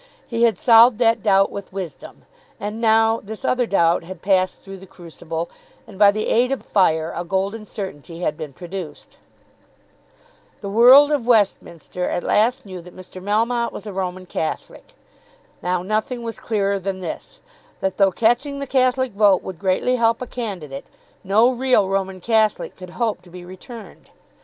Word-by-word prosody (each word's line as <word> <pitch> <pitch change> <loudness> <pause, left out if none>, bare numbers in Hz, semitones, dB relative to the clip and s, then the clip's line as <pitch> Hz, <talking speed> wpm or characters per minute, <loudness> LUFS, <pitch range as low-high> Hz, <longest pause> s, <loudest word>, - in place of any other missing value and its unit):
He 230 -2 -4
had 225 -5 +1
solved 230 +1 +6
that 230 -2 +2
doubt 195 -2 +3
with 200 -1 -8
wisdom. 185 -6 -8 0.4
And 210 +3 -5
now 225 0 +3
this 220 +5 -7
other 250 -2 +1
doubt 170 -5 +2
had 185 +3 -10
passed 185 -1 +1
through 195 0 -9
the 190 +1 -14
crucible, 165 -2 -7 0.4
and 200 -4 -14
by 205 -1 +7
the 215 +1 -1
aid 250 +3 +2
of 270 - -3
fire 160 -5 +1
a 175 - -3
golden 195 +5 -2
certainty 175 -5 -8
had 155 - -1
been 150 -1 -7
produced. 175 0 -9 1.4
The 200 - -5
world 255 +7 +7
of 275 -6 -1
Westminster 185 -6 0
at 175 - -2
last 230 +4 +1
knew 185 -3 -8
that 180 +1 -15
Mr. 185 0 -11
Melmotte 230 +4 0
was 210 - -9
a 205 - -7
Roman 185 -1 -4
Catholic. 175 - -5 0.7
Now 180 0 -1
nothing 220 +5 -2
was 230 -1 -6
clearer 200 -3 -1
than 190 0 -4
this, 170 - -7 0.4
that 190 -1 -2
though 195 -1 +4
catching 245 +8 +1
the 280 - -4
Catholic 260 -1 +1
vote 200 -2 +3
would 185 -3 -8
greatly 195 +6 +1
help 230 -1 +2
a 250 - -5
candidate, 180 - -6 0.4
no 215 +6 +4
real 250 -5 +2
Roman 190 -1 -2
Catholic 220 0 +1
could 185 -1 -11
hope 230 -3 -1
to 180 - -18
be 175 0 -11
returned. 210 +5 -12
200 Hz, 170 wpm, -21 LUFS, 185-230 Hz, 1.4 s, by